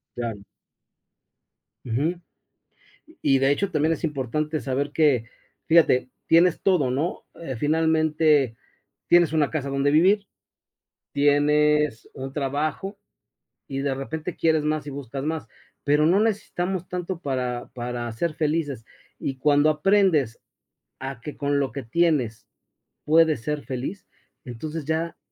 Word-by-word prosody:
Claro. 115 -4 -4 1.4
Ujú. 145 +9 -1 1.1
Y 135 -1 +4
de 135 +1 +3
hecho 195 +8 0
también 155 -1 +1
es 165 - -4
importante 150 +2 -2
saber 140 +2 -2
que, 145 -8 +3 0.4
fíjate, 160 -6 +4 0.2
tienes 170 +1 +4
todo, 170 -10 +2
¿no?, 145 +7 -2 0.2
eh, 135 -7 -5
finalmente, 155 -3 +2 0.5
tienes 175 -3 +5
una 155 -3 +2
casa 140 -3 -3
donde 140 +1 +1
vivir, 190 +7 +4 0.9
tienes 150 -2 +2
un 135 0 -6
trabajo 150 +8 -2 0.7
y 135 0 -4
de 140 -1 -1
repente 155 +5 -5
quieres 160 -2 +2
más 155 -1 -1
y - - -5
buscas 135 0 -6
más, 155 -4 -3 0.4
pero 150 +1 +3
no 180 +5 +4
necesitamos 195 -4 -1
tanto 180 0 -4
para 125 -5 -3
para 120 -1 -4
ser 155 +8 -2
felices, 150 -7 -1 0.3
y 135 -1 -3
cuando 145 +2 +4
aprendes 155 - +2 0.6
a 135 -2 -6
que 150 +5 -8
con 145 0 0
lo 135 -2 -1
que 140 - -5
tienes 130 -4 0 0.6
puedes 155 -4 +4
ser 150 +3 -3
feliz, 135 +10 -5 0.4
entonces 150 +5 -6
ya 160 +2 -2
150 Hz, 130 wpm, -24 LUFS, 135-160 Hz, 1.4 s, tienes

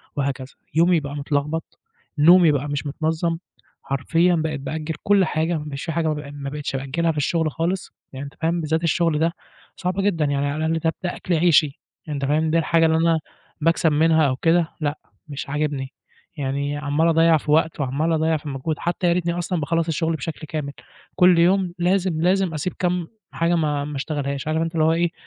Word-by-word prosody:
وهكذا، 140 -2 -3 0.2
يومي 170 0 +4
بقى 145 0 -6
متلخبط، 150 +2 -3 0.4
نومي 170 +1 +7
بقى 145 0 -1
مش 145 +1 -3
متنظّم، 160 +3 -1 0.5
حرفيًا 165 +6 +1
بقيت 155 -2 -2
بأجّل 155 +2 -4
كلّ 200 -2 +4
حاجة 160 +2 0
مش 150 -2 -6
في 165 - -3
حاجة 165 0 0
ما 155 - +1
بق 150 -1 -7
ما 140 -1 -5
بقِتش 145 -1 -4
بأجّلها 155 +5 0
في 155 - -7
الشغل 155 +1 0
خالص، 175 +4 -2 0.2
يعني 135 +2 -6
أنت 140 - -10
فاهم 165 +1 0
بالذات 160 +2 -1
الشغل 165 -1 +1
ده 165 +1 +1 0.4
صعب 180 0 -2
جدًا، 170 -7 +1
يعني 140 0 0
على 145 +2 -2
الاقل 160 0 0
ده 160 0 0
ده 175 - -2
أكْل 180 - -3
عيشي، 155 -3 +3 0.3
أنت 140 -2 -2
فاهم، 155 +2 +1
ده 165 - +3
الحاجة 165 0 +3
اللي 160 0 +3
أنا 165 -1 +3 0.4
باكسَب 165 0 +3
منها 160 0 +4
أو 130 - 0
كده 165 +3 +2
لأ، 145 0 -1 0.3
مش 140 -1 -6
عاجبني، 145 -2 -2 0.4
يعني 140 +1 -2
عَمّال 145 +3 +1
أضيّع 165 0 +5
في 150 - -3
وقت 160 0 +2
وعَمّال 140 +5 0
أضيّع 160 0 +1
في 150 0 -8
مجهود 140 +3 -3
حتى 175 +1 -1
يا 170 - +4
ريتني 170 -1 0
أصلًا 175 -1 -2
باخلّص 165 +3 0
الشغل 160 +1 0
بشكل 155 0 -6
كامل، 150 -4 -4 0.4
كلّ 180 -2 +5
يوم 180 0 +3
لازم، 180 -2 +1
لازم 185 -1 +2
أسيب 155 +4 -3
كام 180 -2 0 0.2
حاجة 170 +1 +1
ما 150 -3 0
ما 150 -1 -6
اشتغلهاش. 140 -1 -3
عارف 160 +1 0
أنت 165 0 -2
اللي 155 - +2
هو 160 - +4
إيه، 170 0 +1
160 Hz, 200 wpm, -22 LUFS, 145-170 Hz, 0.5 s, نومي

